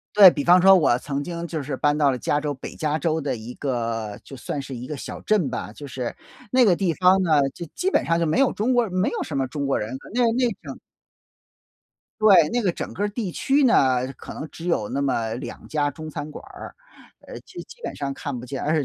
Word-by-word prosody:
对， 200 -3 +11
比 145 -4 -3
方 180 +3 +6
说 195 +1 +8
我 150 -9 +3
曾 140 0 -3
经 170 +1 -5
就 160 -3 -4
是 135 -1 -4
搬 145 0 +2
到 145 -2 +3
了 130 - -2
加 145 +5 0
州 145 -1 -2
北 135 - -9
加 155 0 -1
州 160 -1 0
的 135 -4 -2
一 115 +3 -8
个 115 -6 -3
就 135 - -10
算 140 +3 -4
是 135 -1 -7
一 120 +1 -7
个 150 +2 -6
小 - - -7
镇 205 -9 +1
吧， - - -5
就 145 - -10
是 130 -2 -4 0.4
那 255 -1 +5
个 185 -5 +5
地 180 -2 0
方 185 +1 +4
呢， 155 -4 +3 0.2
就 170 - -6
基 370 - 0
本 - - +2
上 165 0 +1
就 170 - +1
没 160 +10 +1
有 275 -2 +4
中 235 +5 0
国 245 -1 +4
人， 190 - -8
没 185 +1 +1
有 - - -3
什 145 - -4
么 135 - 0
中 140 +2 -4
国 135 - +1
人， 110 +5 -4 0.2
那 250 - +1
那 245 0 +1
种。 - - -8 1.4
对， 190 -7 +7
那 245 - 0
个 195 -5 +1
整 - - -6
个 205 +2 -1
地 205 -2 -4
区 280 - +1
呢， 130 - +3
可 - - -11
能 150 - -6
只 170 - -8
有 110 -12 0
那 140 - -2
么 115 -5 -1
2 120 - -8
家 145 -2 0
中 155 +2 -9
餐 150 -1 -6
馆 150 - -10
儿， - - -10 0.5
呃， - - -9
基 - - -10
基 475 - -16
本 - - -4
上 140 -1 -3
看 140 -2 -5
不 120 - -8
见， 130 +1 -5
而 155 +2 +1
150 Hz, 265 characters per minute, -23 LUFS, 135-185 Hz, 1.4 s, 对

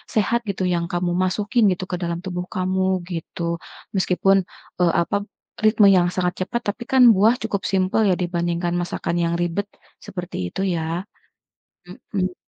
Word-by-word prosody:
sehat 225 +2 +2
gitu 190 -1 -2
yang 170 0 0
kamu 175 0 0
masukin 210 +5 +1
gitu 180 - -2
ke - - 0
dalam 170 0 -2
tubuh 180 -1 -3
kamu, 185 0 0 0.3
gitu. 170 +1 -6 0.5
Meskipun, 195 +1 +3 0.4
e - - +5 0.2
apa, 170 - -1 0.5
ritme 215 -1 +5
yang 175 0 +3
sangat 180 -1 0
cepat, 235 +5 -3
tapi 245 - -26
kan 265 -1 +5
buah 215 +5 +4
cukup 205 -3 -3
simpel 190 +2 +2
ya - - +4
dibandingkan 175 -1 -1
masakan 175 -1 -3
yang 170 - 0
ribet, 175 +4 -1 0.4
seperti 180 -1 -6
itu 190 - -4
ya. 165 +3 -2 1.1
Mhm. 185 -2 0
185 Hz, 155 wpm, -22 LUFS, 175-200 Hz, 1.1 s, e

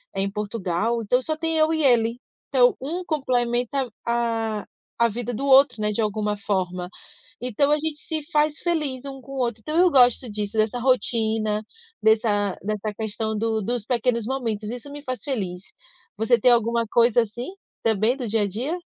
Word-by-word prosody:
em 195 +1 0
Portugal, 210 +1 -1
então 250 +5 +2
só 310 +4 -2
tem 325 0 -1
eu 315 +1 +3
e 315 - 0
ele. 235 -2 +3 0.3
Então 250 -3 +4
um 345 +7 -4
complementa 250 -3 0 0.2
a 230 -3 -1 0.4
a - - +6
vida 245 +3 -4
do 270 +5 -3
outro, 265 -4 +5
né, 210 - +1
de 210 - -3
alguma 210 -1 -1
forma. 185 -3 -2 0.5
Então 250 +4 +1
a - - +6
gente 310 0 -3
se 315 -2 -3
faz 300 0 +2
feliz 300 -7 -1
um 270 -1 -7
com 275 - -12
o - - -6
outro. 235 -2 -3
Então 305 +7 -2
eu 360 0 +6
gosto 250 -2 +4
disso, 210 +1 -4
dessa 215 +3 +1
rotina 220 -4 +1 0.4
dessa 210 -3 +2
dessa 210 0 -3
questão 220 0 -2
do 220 0 0
dos 235 0 -2
pequenos 240 -2 +1
momentos. 225 -5 -2
Isso 250 +4 -7
me 290 - -8
faz 255 -2 -4
feliz. 195 -10 -3 0.5
Você 225 +2 +2
tem 250 - +5
alguma 230 0 +2
coisa 235 0 +4
assim 230 - -6 0.3
também 220 +3 +2
do 250 -4 -4
dia 220 0 +1
a 200 - -1
dia? 255 - -3
235 Hz, 180 wpm, -24 LUFS, 215-265 Hz, 0.5 s, a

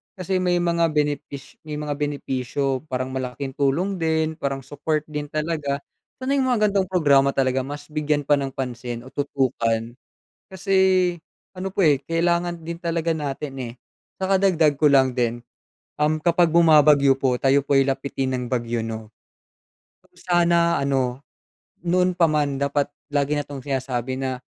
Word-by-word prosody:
kasi 185 0 -1
may 180 -1 +1
mga 170 -1 +2
benepis 145 -2 -3
may 150 - -6
mga 150 -1 -3
benepisyo, 135 -1 -2
parang 130 -1 -3
malaking 130 +1 -4
tulong 170 +8 +1
din, 160 -1 0
parang 135 -1 -2
support 150 +3 -2
din 150 -1 -4
talaga. 150 -2 -2 0.4
Sana 260 +2 -1
yung 265 - +1
mga 215 -4 +3
ganitong 195 -2 +1
programa 140 -6 +3
talaga 130 -1 +1
mas 145 +1 -8
bigyan 150 -1 0
pa 145 0 +3
ng 135 -1 -4
pansin 120 -2 -5
o 130 - -13
tutukan 120 -5 -1 0.6
kasi 190 +1 -1 0.8
ano 190 +1 -2
po 195 - +1
eh, 145 -3 +4
kailangan 170 0 0
din 170 +1 -5
talaga 165 -1 -1
natin 145 -2 -4
eh. 120 -3 -5 0.4
Saka 190 0 +1
dagdag 160 -7 +3
ko 150 - +3
lang 135 -2 +5
din, 120 -1 -1 0.6
um, 155 +1 +2
kapag 170 0 +4
bumabagyo 150 -4 +6
po, 130 -2 +2
tayo 135 +2 +3
po 140 - +2
ay 135 - +6
lapitin 135 -1 -2
ng 125 - -3
bagyo, 120 -2 -2
'no? 110 -1 -6 0.9
Kung - - -31
sana 170 -1 +2
ano, 135 -2 0 0.6
noon 180 +1 +2
pa 170 -2 +4
man 145 -2 0
dapat 140 0 +1 0.3
lagi 145 +1 +1
na 145 - -1
'tong 140 -2 -7
sinasabi 130 -2 -2
na 130 -1 -3
145 Hz, 160 wpm, -23 LUFS, 135-165 Hz, 0.9 s, bumabagyo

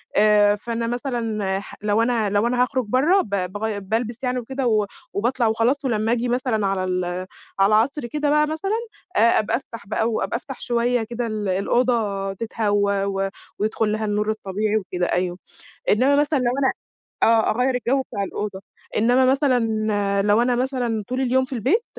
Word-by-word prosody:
آآ 210 -1 +5
فأنا 230 +2 -3
مثلًا 230 -6 -2
ح 200 - -11
لو 210 +1 +2
أنا 230 -3 +1
لو 205 +3 +2
أنا 245 +1 +1
هاخرج 255 -1 -1
برّا 285 - +3
ب - - -8
باغي 200 +2 -2
بالبس 225 +5 -3
يعني 250 0 0
وكده 265 +2 -3
و 215 -2 +2 0.3
وباطلع 240 +3 +1
وخلاص 235 +6 +1
ولمّا 220 -3 0
اجي 240 +1 0
مثلًا 240 -4 0
على 195 -1 -1
ال 185 -1 -1 0.5
على 195 - +6
العصر 235 +7 +2
كده 295 +4 -1
بقى 300 +1 +3
مثلًا 320 +7 -2 0.4
آآ - - +3 0.2
أبقى 220 +2 0
أفتح 230 -5 -11
بقى 220 +2 0
و 225 - -1
أبقى - - -1
أفتح 270 +1 -9
شوية 240 0 +1
كده 235 +1 -4
ال 215 -2 -3
الأوضة 200 0 0
تتهوّى 205 -2 0
و 195 0 -1 0.3
ويدخل 215 0 0
لها 215 0 -1
النور 210 0 0
الطبيعي 215 0 -1
وكده 180 -3 -2
أيوه، 180 0 -1 0.5
إنّما 255 +7 +4
مثلًا 290 +1 +2
لو 245 -1 +1
أنا 270 - +2 0.5
آه 225 -1 +4
أغيّر 250 +4 +1
الجو 250 +2 +1
بتاع 215 -6 -4
الأوضة، 200 0 -4 0.4
إنّما 245 +4 +4
مثلًا 265 -1 +3 0.6
لو 205 +3 +3
أنا 245 0 +2
مثلًا 245 -4 -1
طول 255 +1 -2
اليوم 260 0 +2
في 260 - -8
البيت 270 - +1
230 Hz, 175 wpm, -22 LUFS, 205-255 Hz, 0.6 s, على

